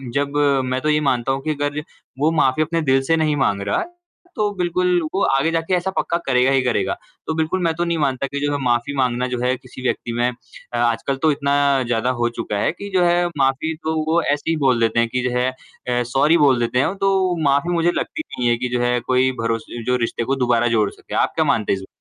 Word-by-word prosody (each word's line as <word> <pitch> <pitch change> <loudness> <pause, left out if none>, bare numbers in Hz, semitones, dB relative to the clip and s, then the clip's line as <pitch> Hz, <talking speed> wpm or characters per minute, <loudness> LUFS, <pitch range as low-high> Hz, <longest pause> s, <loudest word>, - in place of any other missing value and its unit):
जब 140 +1 0 0.3
मैं 130 0 -2
तो 155 - 0
ये 150 0 +3
मानता 125 +1 0
हूँ 135 +1 -2
कि - - +2
अगर 145 0 -2 0.4
वो 155 +3 +3
माफ़ी 130 +4 +2
अपने 165 +1 -1
दिल 135 -3 +2
से 165 +5 +2
नहीं 155 -2 +1
माँग 115 -8 +1
रहा 100 0 0
है, 350 0 -6 0.4
तो 210 -1 +1
बिल्कुल 180 0 +1
वो 195 - 0
आगे 135 +5 +2
जा 165 - +1
के - - 0
ऐसा 180 +1 0
पक्का 170 -3 -1
करेगा 130 0 +3
ही 135 -1 +3
करेगा। 125 -2 0 0.3
तो 160 - 0
बिल्कुल 160 +3 0
मैं 165 -1 +2
तो 170 - -1
नहीं 170 -1 -1
मानता 140 -3 0
कि 140 +1 -4
जो 145 - 0
है - - 0
माफ़ी 120 +3 0
माँगना 125 -1 +1
जो 125 -1 -3
है 125 +1 +2
किसी 130 0 -12
व्यक्ति 120 -2 -2
में 120 +1 +1
अ, 120 0 -10
आजकल 120 +3 0
तो 155 - +5
इतना 140 0 0 0.3
ज़्यादा 120 +1 0
हो 120 - +2
चुका 105 - -3
है - - +1
कि 200 +4 -8
जो 185 -1 +3
है 175 0 +3
माफ़ी 135 +4 +1
तो 160 0 -1 0.2
वो 170 +1 +3
ऐसे 145 +2 -1
ही 165 - +2
बोल 125 -2 +3
देते 115 0 +2
हैं 115 0 +2
कि 125 +2 -1
जो 125 - -1
है 125 +1 +2
अ, 125 -1 -4
सॉरी 150 +5 +4
बोल 140 -6 +4
देते 120 +1 0
हैं। 165 +9 +1
तो 190 -2 +1
माफ़ी 140 +6 +1
मुझे 170 0 +2
लगती 315 - -3
नहीं 120 -1 -1
है 120 - +2
कि 125 +1 -3
जो 120 - -1
है 120 0 +1
कोई 130 0 +3
भरोस 115 0 -1 0.2
जो 125 - +2
रिश्ते 120 - -3
को 135 +4 0
दोबारा 120 0 +2
जोड़ 105 -2 +2
सके। - - -9
आप - - -8
क्या - - +2
मानते 110 -2 +1
हैं - - -1
इस 95 - -8
में - - -10
135 Hz, 255 wpm, -20 LUFS, 125-160 Hz, 0.4 s, तो